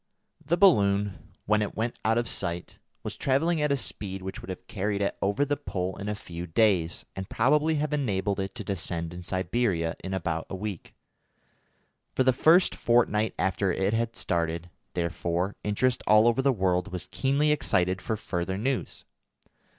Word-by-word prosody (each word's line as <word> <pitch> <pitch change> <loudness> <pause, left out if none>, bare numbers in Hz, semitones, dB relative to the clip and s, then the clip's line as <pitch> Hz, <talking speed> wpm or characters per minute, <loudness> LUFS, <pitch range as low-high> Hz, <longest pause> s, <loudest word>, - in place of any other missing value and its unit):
The 170 +5 +1
balloon, 100 - +3
when 105 +1 +3
it 105 - -3
went 115 +2 -1
out 110 +1 +2
of 120 0 0
sight, 85 -5 -3 0.2
was - - -4
travelling 155 +5 +1
at 150 -1 +1
a 140 - +3
speed 95 -5 -4
which 95 - -6
would - - -10
have 95 0 -6
carried 100 +1 -2
it 100 - 0
over 100 +8 +1
the 145 +1 0
Pole 95 -9 -3
in 100 +1 -4
a 105 - -1
few 85 -4 -7
days, 90 -2 +2
and 95 0 -6
probably 150 +6 +3
have 150 0 -1
enabled 100 -8 0
it 95 0 -3
to 115 - -5
descend 85 -3 -3
in 90 - -7
Siberia 95 -1 0
in 95 0 -3
about 85 -3 -2
a - - -4
week. 100 -2 -6 1.2
For 130 - +3
the 130 0 +4
first 165 +8 +5
fortnight 115 -2 +2
after 95 +1 +1
it 95 +4 0
had 115 0 0
started, 85 0 -2 0.2
therefore, 85 +2 -1
interest 120 +5 +1
all 110 +2 +6
over 120 +2 +3
the 135 +1 +3
world 95 -4 0
was 90 -1 -4
keenly 140 +3 +2
excited 95 -10 +1
for 110 - -2
further 95 -2 -3
news. 130 +4 -2
100 Hz, 175 wpm, -27 LUFS, 90-120 Hz, 1.2 s, all